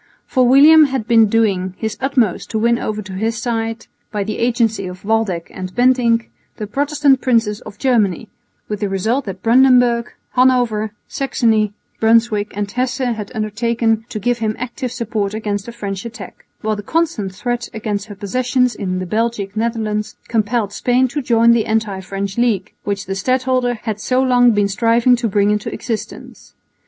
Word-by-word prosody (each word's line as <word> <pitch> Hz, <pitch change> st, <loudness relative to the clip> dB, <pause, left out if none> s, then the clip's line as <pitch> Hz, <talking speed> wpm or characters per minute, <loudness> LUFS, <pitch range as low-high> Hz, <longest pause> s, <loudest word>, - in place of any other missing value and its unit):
For 255 Hz, -2 st, +2 dB
William 300 Hz, +5 st, +7 dB
had 265 Hz, -5 st, -3 dB
been 225 Hz, -2 st, +5 dB
doing 195 Hz, -4 st, +1 dB
his 220 Hz, -1 st, -3 dB
utmost 250 Hz, -8 st, 0 dB
to 220 Hz, -, -2 dB
win 235 Hz, +2 st, +2 dB
over 215 Hz, 0 st, -3 dB
to 190 Hz, 0 st, -9 dB
his 225 Hz, +4 st, -2 dB
side, 225 Hz, -1 st, -3 dB, 0.3 s
by 210 Hz, -2 st, -1 dB
the 215 Hz, +2 st, -4 dB
agency 230 Hz, -4 st, +1 dB
of 180 Hz, +2 st, -10 dB
Waldeck 210 Hz, -6 st, -1 dB
and 185 Hz, -1 st, -7 dB
Bentinck, 245 Hz, -2 st, +2 dB, 0.3 s
the 210 Hz, -, -4 dB
Protestant 285 Hz, +3 st, +1 dB
Princes 225 Hz, -4 st, +1 dB
of 205 Hz, -, -11 dB
Germany, 225 Hz, -5 st, +1 dB, 0.4 s
with 210 Hz, -1 st, -4 dB
the 205 Hz, -, -1 dB
result 220 Hz, +8 st, -1 dB
that 190 Hz, -2 st, -7 dB
Brandenburg, 245 Hz, -1 st, +4 dB, 0.2 s
Hanover, 245 Hz, -4 st, +2 dB, 0.2 s
Saxony, 220 Hz, -6 st, 0 dB, 0.3 s
Brunswick 225 Hz, -2 st, +2 dB
and 205 Hz, -1 st, -2 dB
Hesse 250 Hz, +1 st, -1 dB, 0.2 s
had 210 Hz, -2 st, -7 dB
undertaken 225 Hz, +1 st, 0 dB
to -, -, -5 dB
give 240 Hz, +3 st, 0 dB
him 215 Hz, -1 st, -1 dB
active 250 Hz, 0 st, -5 dB
support 215 Hz, -4 st, -3 dB
against 205 Hz, -2 st, -3 dB
a -, -, -6 dB
French 200 Hz, -5 st, -5 dB
attack; 230 Hz, -5 st, -10 dB
while 215 Hz, 0 st, -1 dB
the 205 Hz, -, -6 dB
constant 220 Hz, -, -1 dB
threat 240 Hz, +3 st, -3 dB
against 210 Hz, -2 st, -4 dB
her 205 Hz, -, -9 dB
possessions 250 Hz, +4 st, 0 dB
in 185 Hz, -3 st, -3 dB
the 185 Hz, -, -3 dB
Belgic 215 Hz, 0 st, -2 dB
Netherlands 220 Hz, -2 st, -2 dB
compelled 220 Hz, -2 st, 0 dB
Spain 250 Hz, +3 st, +2 dB
to 290 Hz, +4 st, -3 dB
join 235 Hz, -2 st, +4 dB
the 235 Hz, -2 st, +2 dB
anti 220 Hz, -3 st, -1 dB
French 195 Hz, +2 st, -4 dB
league 220 Hz, -6 st, 0 dB
which 200 Hz, -1 st, -2 dB
the 195 Hz, -, -3 dB
stadholder 255 Hz, +4 st, 0 dB
had 215 Hz, -2 st, -3 dB
so 255 Hz, +4 st, 0 dB
long 250 Hz, -2 st, +4 dB
been 205 Hz, -3 st, +2 dB
striving 230 Hz, +4 st, +3 dB
to 235 Hz, -1 st, -1 dB
bring 205 Hz, +1 st, +2 dB
into 210 Hz, 0 st, -2 dB
existence. 225 Hz, -3 st, -7 dB
225 Hz, 170 wpm, -18 LUFS, 205-245 Hz, 0.4 s, William